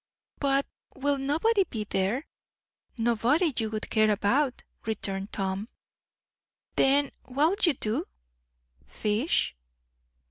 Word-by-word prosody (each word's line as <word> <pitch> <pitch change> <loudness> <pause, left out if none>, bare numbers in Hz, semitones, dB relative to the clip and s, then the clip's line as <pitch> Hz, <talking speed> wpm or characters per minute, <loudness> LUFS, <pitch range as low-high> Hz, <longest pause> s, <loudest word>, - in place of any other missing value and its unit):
"But 275 -1 +2 0.3
will 280 0 0
nobody 330 +10 +2
be 220 -11 -4
there?" 205 - -1 0.7
"Nobody 240 - +2
you 220 -1 0
would 215 0 -5
care 215 -1 +4
about," 250 +7 +1 0.2
returned 195 -2 -2
Tom. 195 +2 -2 1.1
"Then 275 +1 +4
what'll 305 - +1
you 295 - +1
do?" 215 -2 -1 0.8
"Fish." 210 - 0
245 Hz, 100 wpm, -28 LUFS, 215-285 Hz, 1.1 s, care